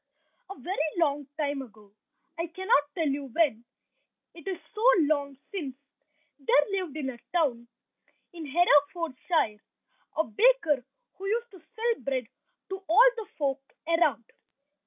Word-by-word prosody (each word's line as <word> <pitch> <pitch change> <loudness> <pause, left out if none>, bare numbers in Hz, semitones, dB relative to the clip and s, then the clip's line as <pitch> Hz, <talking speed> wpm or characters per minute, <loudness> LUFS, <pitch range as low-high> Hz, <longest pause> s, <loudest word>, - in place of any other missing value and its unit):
A 390 - -8
very 370 -2 -3 0.2
long 290 -4 +1
time 285 -2 -1
ago, 210 -5 -14 0.4
I 335 +1 -2
cannot 375 0 +2
tell 325 -4 +1
you 280 0 -1
when, 265 -4 +1 0.7
it 335 +2 -13
is 380 -2 -2 0.2
so 425 - -6 0.2
long 285 -2 0
since, 305 -10 -4 0.6
there 280 +1 +4 0.2
lived 310 -5 -6
in 270 -3 -2
a 240 - -12
town 265 -9 +1 0.7
in 330 -3 -7
Herefordshire 295 - +2 0.6
a 320 - +4
baker 310 - +3 0.4
who 390 - -4
used 470 +3 -1
to 380 - -13 0.2
sell 460 +1 0
bread 260 -4 -1 0.4
to 385 0 -5
all 460 +9 +8
the 445 -3 -6
folk 275 -2 0 0.3
around. 330 -8 +2
310 Hz, 135 wpm, -28 LUFS, 275-370 Hz, 0.7 s, all